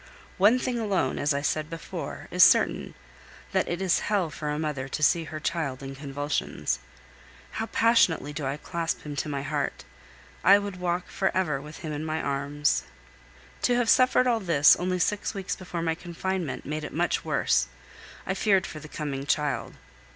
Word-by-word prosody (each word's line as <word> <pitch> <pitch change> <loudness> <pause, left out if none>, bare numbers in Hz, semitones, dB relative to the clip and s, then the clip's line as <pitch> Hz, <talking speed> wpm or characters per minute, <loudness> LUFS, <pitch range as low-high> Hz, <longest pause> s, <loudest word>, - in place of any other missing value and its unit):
One 210 +6 +6
thing 250 -1 -2
alone, 195 - 0
as 145 - +1
I 140 0 0
said 155 +1 -1
before, 165 -1 -6
is - - +6
certain, - - +4 0.6
that - - +1
it 175 +2 -2
is 185 -3 +3
hell 195 -6 +1
for 150 -1 -4
a 150 - -1
mother 150 -4 -2
to 155 - -3
see 165 +2 +4
her 155 0 -6
child 150 -5 -2
in 135 0 -6
convulsions. 140 - -2 0.7
How 225 - -3
passionately 190 -12 +3
do 150 0 -4
I 135 +2 -2
clasp 165 +1 -3
him 150 -1 -6
to 150 - -2
my 140 -1 -3
heart! 145 -1 -2 0.6
I 200 +2 +8
could 200 -2 -4
walk 180 0 -1
for 190 - 0
ever 155 -7 0
with 150 +2 -10
him 155 - -3
in 150 +1 -4
my 160 0 -2
arms! 145 +1 0 0.8
To 245 - +3
have 240 -2 +3
suffered 255 0 +5
all 240 -2 +2
this 165 -7 +6
only 180 +1 -1
six 205 +4 0
weeks 190 -2 -3
before 175 -2 -5
my 165 -1 +1
confinement 175 -1 -4
made 155 +1 -3
it - - -6
much - - 0
worse; 60 - +2 0.6
I 190 - -1
feared 195 -1 +2
for 155 - -7
the 150 - -10
coming 140 -3 -4
child. 150 -1 0
160 Hz, 185 wpm, -27 LUFS, 145-190 Hz, 0.8 s, I